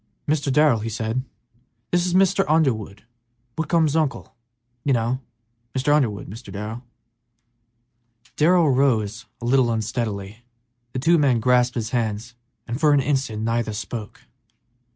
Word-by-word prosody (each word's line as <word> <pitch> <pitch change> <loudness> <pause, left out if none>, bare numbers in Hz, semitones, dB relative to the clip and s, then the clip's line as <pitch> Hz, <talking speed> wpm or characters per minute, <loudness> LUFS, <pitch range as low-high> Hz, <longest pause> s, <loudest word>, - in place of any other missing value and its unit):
"Mr. 145 -2 +1
Darrell," 145 -4 +4
he 110 +2 -4
said, 110 +2 -2 0.7
"this 175 0 +2
is 180 - 0
Mr. 195 +1 +4
Underwood, 120 -10 +1 0.5
Whitcomb's 160 -2 +1
uncle, 155 -4 -1 0.5
you 140 - +2
know; 120 +2 0 0.6
Mr. 130 +3 +2
Underwood, 120 -9 +1
Mr. 115 +5 -10
Darrell." 105 +4 -5 1.5
Darrell 170 0 +4
rose 115 -4 +1
a - - -5
little 125 0 +3
unsteadily; 110 -1 -3 0.5
the - - -3
two 165 +6 +3
men 135 -5 +3
grasped 125 +1 +2
hands 115 0 -2 0.3
and 120 +2 -3
for 150 -1 +4
an 145 - +4
instant 130 -6 -1
neither 115 -1 -1
spoke. 110 0 -6
125 Hz, 130 wpm, -23 LUFS, 110-145 Hz, 1.5 s, Darrell